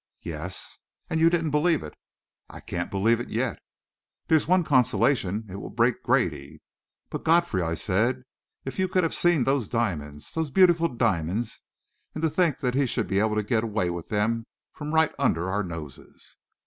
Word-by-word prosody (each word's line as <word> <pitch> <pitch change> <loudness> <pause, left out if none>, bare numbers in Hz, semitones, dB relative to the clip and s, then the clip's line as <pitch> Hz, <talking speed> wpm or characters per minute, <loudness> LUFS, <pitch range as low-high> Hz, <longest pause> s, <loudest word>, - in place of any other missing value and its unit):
"Yes." 85 +3 -5 0.3
"And 160 - +1
you 165 +1 +6
didn't 165 -3 0
believe 155 +2 +2
it." 75 - -8 0.6
"I - - -10
can't 90 0 -4
believe 110 +4 +2
it 120 - -6
yet." - - -2 0.7
"There's 160 -2 +3
one 180 +1 +4
consolation 125 - +2
it 95 0 -7
will - - -7
break 115 0 +1
Grady." 85 - 0 0.5
"But, - - -5
Godfrey," 165 - +3
I 85 -1 -1
said, 115 - 0 0.4
"if 135 - -6
you 190 - +2
could 185 0 +1
have 165 - 0
seen 175 -6 +3
those 135 -5 +1
diamonds 75 -11 -3
those 160 -2 -1
beautiful 170 +1 +4
diamonds 110 - -1 0.5
and 155 - -4
to 160 - +2
think 165 -3 +1
he 135 0 +2
should 115 -2 -1
be 95 - +1
able 110 0 +1
to 105 - 0
get 110 +2 0
away 105 -6 -1
with 85 -1 -6
them 115 +2 0 0.2
from 150 0 -6
right 160 -1 +3
under 95 -9 +1
our 100 +1 0
noses!" 80 -7 -10
115 Hz, 175 wpm, -26 LUFS, 95-155 Hz, 0.7 s, you